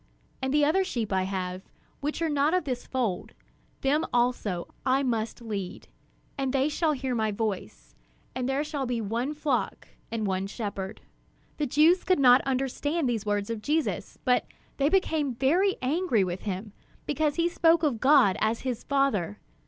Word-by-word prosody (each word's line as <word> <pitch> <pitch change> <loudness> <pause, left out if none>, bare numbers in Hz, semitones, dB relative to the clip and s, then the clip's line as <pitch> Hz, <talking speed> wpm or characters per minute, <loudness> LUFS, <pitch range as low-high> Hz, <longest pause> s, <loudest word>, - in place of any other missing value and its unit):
And 265 +2 0
other 305 +6 +4
sheep 235 - -3
I 190 0 +1
have, 185 -1 -3 0.4
which 295 +3 -2
are - - +2
not 295 +3 +2
of 365 - +1
this 255 -4 -4
fold; 235 -8 -2 0.5
them 290 +3 +2
also 240 -7 0
I 265 +2 +2
must 230 -2 -2
lead; 200 -5 -5 0.5
and 270 -1 0
they 270 +2 +2
shall 310 +1 +1
hear 260 -2 -2
my 220 -2 +1
voice; 185 - -4 0.4
and 255 0 -2
there 275 +2 +1
shall 295 -3 -3
be 240 -1 -1
one 235 +7 -2
flock 280 -8 -2 0.2
and 225 -2 -2
one 190 0 -1
shepherd." 200 -2 -5 0.6
The 295 - 0
Jews 315 +7 +4
could 370 - +3
not 255 -1 +7
understand 270 +4 0
these 225 -3 -2
words 205 +1 0
of 225 -2 -4
Jesus; 305 +5 -1
but 250 -1 +2 0.3
they 280 +1 +3
became 315 -8 +1
very 350 - +2
angry 275 - +2
with 180 0 -3
him, 195 +2 -5 0.3
because 300 0 0
he 335 0 +2
spoke 335 -1 +3
of 270 -7 +1
God 260 -8 +5
as 220 +1 +1
his 250 -3 -3
Father. 225 - 0
255 Hz, 170 wpm, -27 LUFS, 215-295 Hz, 0.6 s, not